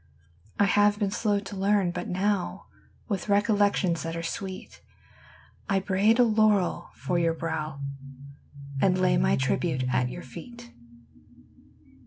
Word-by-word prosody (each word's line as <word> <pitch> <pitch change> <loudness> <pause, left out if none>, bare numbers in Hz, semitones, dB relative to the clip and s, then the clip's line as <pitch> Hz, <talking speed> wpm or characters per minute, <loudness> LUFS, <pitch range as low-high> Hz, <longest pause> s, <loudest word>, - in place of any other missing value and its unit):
I 205 - +4
have 205 +1 +3
been 205 -2 -1
slow 205 -1 0
to 200 0 -8
learn, 195 -1 +2
but 175 0 -5
now, 195 +1 -1 0.4
With 200 -2 -3
recollections 205 -4 +2
■ - - -5
that 165 0 -4
are 165 - -4
sweet, 190 +2 -6 0.9
I 195 -1 +3
braid 200 +4 +2
a 250 - +6
laurel 215 -4 +2
for 175 -1 -1
your 165 -1 +1
brow 155 -3 -4 1.0
And 185 -1 +3
lay 185 0 +3
my 65 +1 +3
tribute 65 - 0
at 125 0 +1
your - - -7
eet. 240 +5 -10
195 Hz, 140 wpm, -27 LUFS, 170-205 Hz, 1.0 s, a